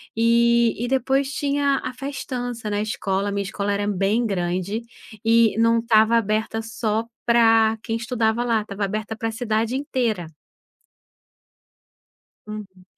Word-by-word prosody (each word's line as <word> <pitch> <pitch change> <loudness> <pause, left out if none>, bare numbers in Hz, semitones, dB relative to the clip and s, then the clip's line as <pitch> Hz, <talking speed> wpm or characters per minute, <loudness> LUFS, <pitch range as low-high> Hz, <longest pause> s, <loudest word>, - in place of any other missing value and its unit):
e 235 0 +3
e - - -3
depois 270 +2 +1
tinha 280 -1 +1
a - - -4
festança 245 -4 -5
na 205 0 -1
escola, 200 -2 -1
minha 200 0 -1
escola 200 +1 -2
era 205 0 -1
bem 205 +4 +1
grande, 185 +1 -2 0.4
e 230 -1 +4
não 230 0 +4
estava 225 -1 +4
aberta 220 +1 -1
só 220 0 -2 0.2
pra 225 -2 +4
quem 225 -1 -2
estudava 230 -1 0
lá, 230 -2 +2
estava 200 -1 -3
aberta 215 +2 -4
pra 225 +1 -3
cidade 225 0 -1
inteira. 235 - -1 2.2
Uhum. 200 -3 -9
225 Hz, 130 wpm, -23 LUFS, 210-235 Hz, 2.2 s, e